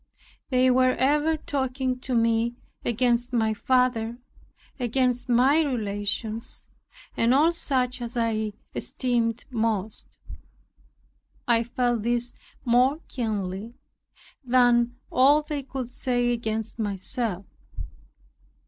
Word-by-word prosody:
They 255 -1 +4
were 255 0 +4
ever 300 +4 +2
talking 260 -3 -2
to 255 0 -3
me 230 +1 +2 0.3
against 240 +1 +1
my 220 -2 +2
father, 240 -1 +1 0.6
against 250 0 0
my 260 +6 +4
relations, 220 -3 -1 0.5
and 235 +3 +3
all 310 +4 +5
such 255 -6 -1
as 240 0 -5
I 220 -2 0 0.2
esteemed 235 -2 -1
most. 220 -3 -2 1.3
I 235 -1 +4
felt 240 -1 0
this 240 +2 0 0.3
more 250 +4 +4
keenly 215 -2 -3 0.7
than 245 -1 +3 0.2
all 285 +4 +5
they 295 -1 -4
could 260 -2 -6
say 245 -1 0
against 225 -1 -3
myself. 205 -1 -3
240 Hz, 100 wpm, -25 LUFS, 230-255 Hz, 1.3 s, all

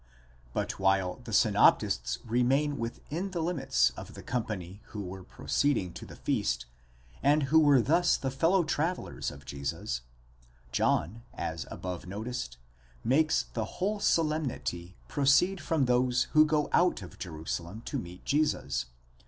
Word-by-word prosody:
But - - -3
while 95 -1 +2
the - - -8
synoptists - - +3
remain 135 +5 +2
within 150 +10 -4
the 185 -3 -4
limits 135 - +2
of - - -10
the - - -9
company 105 -6 -4
who 105 -2 -6
were 95 0 -7
proceeding 95 -5 0
to - - -9
the - - -11
feast, - - -1 0.6
and 145 +2 +4
who 160 - +8
were 145 -5 +5
thus 170 +6 +3
the 135 - -2
fellow 165 +7 +3
travellers 165 +3 -2
of 70 -1 -12
Jesus, 70 -3 -3 0.7
John, 110 - +1
as 80 0 -4
above 90 -1 -6
noticed, 100 - -5 0.5
makes 155 +6 +3
the - - -1
whole 205 +3 0
solemnity 150 - 0
pro 145 - -2
ceed 180 +7 +4
from 160 -6 +1
those 125 0 +3
who 155 0 +6
go 150 -1 +1
out 175 - +3
of 85 - -12
Jerusalem 85 +4 -5
to 140 - -2
meet 90 -3 -10
Jesus 150 - +1
(v. - - -25
125 Hz, 145 wpm, -30 LUFS, -, 0.7 s, who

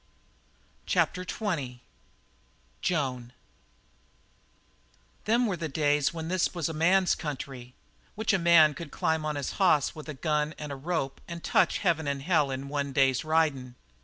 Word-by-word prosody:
CHAPTER 180 - +1
XX 165 - -3 1.0
JOAN 130 -8 -2 1.9
"Them 235 +3 +3
were 200 -5 0
the 165 -2 -4
days 145 0 +1
when 160 -1 -6
this 185 +1 0
was 170 -4 -1
a 160 - -4
man's 180 +4 +3
country, 130 -4 -6 0.4
which 220 0 0
a 195 - +2
man 170 -3 +6
could 160 +2 -8
climb 160 +2 -1
on 150 -1 -2
his 140 -2 -3
hoss 155 -7 +3
with 155 0 -10
a 150 - -5
gun 150 +1 -1
and 150 -1 -6
a - - -4
rope 140 -1 -3
and 170 -1 -7
touch - - +2
heaven 165 -5 0
and 140 -1 -2
hell 155 -4 +2
in 135 +1 -4
one 140 -1 -3
day's 135 -1 +3
ridin'. 150 -6 0
155 Hz, 155 wpm, -28 LUFS, 140-170 Hz, 1.9 s, man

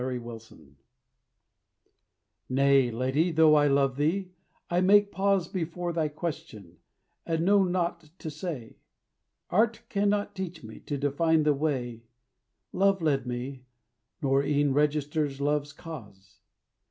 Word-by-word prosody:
CAPTIVITY 115 - -8 1.7
Nay, 135 -1 +4
lady, 130 +9 0
though 160 -1 +5
I 145 -1 +5
love 140 -1 +2
thee, 180 +6 0 0.4
I 175 +1 +1
make 205 +2 +5
pause 195 -1 +1
Before 175 -1 -3
thy 160 -2 0
question, 145 - -7 0.4
and 165 0 -1
know 200 +1 +5
naught 175 -3 -2
to 160 - -6
say; 145 -9 -6 0.7
Art 225 +4 +2
cannot 205 -1 0
teach 180 -5 -6
me 110 0 -10
to 145 - -2
define 155 +3 +2
the 150 0 +3
way, 130 -6 -2 0.7
Love 195 0 +3
led 140 -6 0
me, 125 +1 -5 0.6
nor 135 0 +3
e'en 145 -1 +1
register 150 +1 +1
Love's 145 0 0
cause. 105 -12 -11
150 Hz, 120 wpm, -28 LUFS, 135-175 Hz, 1.7 s, though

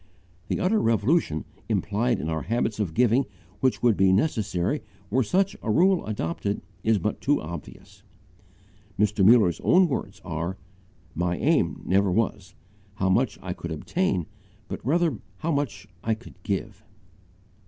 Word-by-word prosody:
The - - -1
utter 210 +4 +2
revolution 115 - +1 0.2
implied 110 +2 +1
in 80 - -3
our 80 -1 -1
habits 115 +1 -1
of 90 -7 -2
giving 125 +4 +3 0.3
which 130 +1 +1
would 120 -3 +5
be 95 -1 +4
necessary 105 - +1 0.3
were 130 +4 +3
such 190 - +1
a - - -4
rule 180 - +4
adopted 100 0 -2 0.2
is 110 -1 +3
but 105 +3 -2
too 145 +2 +2
obvious. 80 -1 -9 1.0
Mr. 105 0 +2
Muller's 105 -5 +6
own 185 0 +5
words 135 - -4
are: 85 +2 -3 0.6
"My 90 0 -1
aim 145 - +1
never 95 +1 +3
was, 110 +1 -1 0.4
how 95 -2 0
much 120 +5 +2
I 90 -1 -3
could 85 - -7
obtain, 95 - -1 0.4
but - - -6
rather 160 -2 +1 0.2
how 165 - -2
much 110 -10 -2 0.2
I 110 -1 +1
could 115 +2 -14
give." 100 +1 -3
105 Hz, 145 wpm, -26 LUFS, 95-130 Hz, 1.0 s, Muller's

